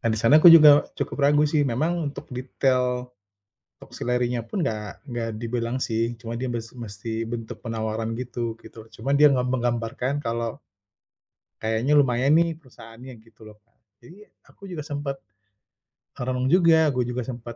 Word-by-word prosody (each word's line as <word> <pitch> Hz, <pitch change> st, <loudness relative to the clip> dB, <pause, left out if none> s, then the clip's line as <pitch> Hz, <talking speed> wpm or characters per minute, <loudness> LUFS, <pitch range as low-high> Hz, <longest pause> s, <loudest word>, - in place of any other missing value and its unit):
Nah, 115 Hz, -, -1 dB
di -, -, -1 dB
sana 145 Hz, +7 st, +5 dB
aku 175 Hz, -, +9 dB
juga 150 Hz, -3 st, +8 dB
cukup -, -, -4 dB
ragu 150 Hz, +1 st, +4 dB
sih 150 Hz, 0 st, +1 dB
memang 155 Hz, +5 st, -1 dB
untuk -, -, -9 dB
detail 125 Hz, -1 st, -1 dB, 0.6 s
top -, -, -17 dB
salary-nya 125 Hz, 0 st, -1 dB
pun 190 Hz, -5 st, -2 dB
nggak 105 Hz, +2 st, -5 dB
nggak 120 Hz, -1 st, -3 dB
dibilang 115 Hz, +1 st, -3 dB
sih 115 Hz, -1 st, -2 dB
cuma 115 Hz, 0 st, -8 dB
dia 130 Hz, -, -2 dB
mes 120 Hz, -2 st, -4 dB
mesti 115 Hz, -1 st, -6 dB
bentuk 115 Hz, -1 st, -6 dB
penawaran 110 Hz, 0 st, -3 dB
gitu 120 Hz, -2 st, -4 dB
gitu. 110 Hz, 0 st, -13 dB
Cuma 130 Hz, +5 st, -4 dB
dia 145 Hz, +1 st, +6 dB
nge 130 Hz, -3 st, +1 dB
menggambarkan 125 Hz, +1 st, -2 dB
kalau 115 Hz, +1 st, -3 dB, 1.1 s
kayaknya 110 Hz, +6 st, 0 dB
lumayan 135 Hz, 0 st, +3 dB
nih 165 Hz, 0 st, +2 dB
perusahaannya 120 Hz, -4 st, -14 dB
gitu 115 Hz, -1 st, -19 dB
loh, 110 Hz, -, -12 dB
Kak. 115 Hz, +2 st, -43 dB, 0.2 s
Jadi 185 Hz, -, -15 dB, 0.2 s
aku 200 Hz, -, -15 dB
juga 175 Hz, -5 st, -6 dB
sempat 145 Hz, -2 st, -5 dB, 1.0 s
merenung 125 Hz, +1 st, -1 dB
juga, 165 Hz, -4 st, +5 dB
aku 125 Hz, -2 st, -1 dB
juga 125 Hz, 0 st, -3 dB
sempat 120 Hz, -1 st, -8 dB
125 Hz, 160 wpm, -24 LUFS, 115-140 Hz, 1.1 s, aku